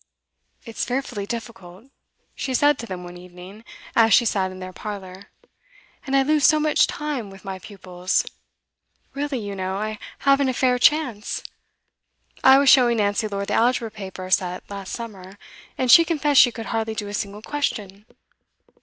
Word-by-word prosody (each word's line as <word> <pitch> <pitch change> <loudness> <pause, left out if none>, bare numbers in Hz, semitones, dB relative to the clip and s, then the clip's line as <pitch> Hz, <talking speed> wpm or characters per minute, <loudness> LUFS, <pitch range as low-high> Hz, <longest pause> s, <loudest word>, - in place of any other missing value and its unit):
'It's 230 -2 -4
fearfully 245 -5 -3
difficult,' 225 -1 -8 0.4
she 260 -2 -3
said 290 +3 +3
to 235 - -6
them 180 -3 -6
one 175 0 -10
evening, 180 +4 -13 0.3
as 225 -1 +6
she 240 - +4
sat 195 -4 0
in 185 - -10
their 185 0 -8
parlour. 195 -2 -8 0.8
'And 270 - 0
I 270 - +4
lose 300 +1 +1
so 310 +1 +5
much 305 0 +3
time 290 -8 -4
with 195 +1 -14
my 190 -1 -5
pupils. 185 -2 -2 0.9
Really, 285 -1 -3
you 205 -3 -5
know, 190 0 -3
I 215 +1 -4 0.2
haven't 275 -1 +3
a 255 - -2
fair 250 -1 +2
chance. 250 -7 +1 1.0
I 265 0 +8
was 280 0 +2
showing 245 -3 +6
Nancy 205 +1 0
Lord 200 -1 -4
the - - -1
Algebra 235 -1 +1
paper 190 -3 -8
set 180 -1 0
last 195 -1 -7
summer, 200 -5 -8 0.4
and 255 -2 +2
she 335 - +9
confessed 300 -4 +3
she 245 - +4
could 225 -1 -7
hardly 220 -1 -2
do 210 -1 -4
a 205 - -7
single 205 +1 -5
question. 210 -8 -4
220 Hz, 170 wpm, -23 LUFS, 195-260 Hz, 1.0 s, she